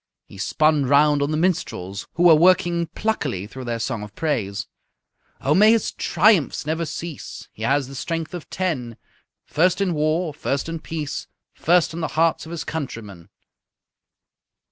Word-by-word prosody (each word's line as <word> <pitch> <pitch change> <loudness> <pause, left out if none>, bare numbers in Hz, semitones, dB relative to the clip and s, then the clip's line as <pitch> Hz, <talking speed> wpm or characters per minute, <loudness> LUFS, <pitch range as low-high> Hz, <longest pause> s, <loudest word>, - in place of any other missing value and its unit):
He 100 - -14
spun 150 +6 +2
round 145 +1 +4
on 140 - +1
the 155 - 0
minstrels, 100 - -2
who 170 - +1
were 175 -2 +8
working 170 +1 +4
pluckily 145 - -2
through 130 +4 -9
their 120 -1 -2
song 115 -1 -3
of 105 0 -9
praise: 110 -11 -2 0.8
_"Oh, 140 - +2
may 210 +6 +6
his 230 - +1
triumphs 175 -5 +2
never 160 +2 -1
cease! 160 0 -7
He - - -14
has 135 +3 +1
the 135 - -10
strength 165 +5 -4
of 175 -4 -7
ten! 130 -11 -3 0.5
First 180 +5 +2
in 195 -3 +1
war, 155 +2 0
first 140 +1 -2
in 165 0 -4
peace, 155 -2 -5 0.3
First 175 0 +2
in 165 - -5
the 160 - 0
hearts 165 0 +2
of - - -9
his 170 - -4
countrymen." 105 - -6
155 Hz, 165 wpm, -22 LUFS, 130-170 Hz, 0.8 s, were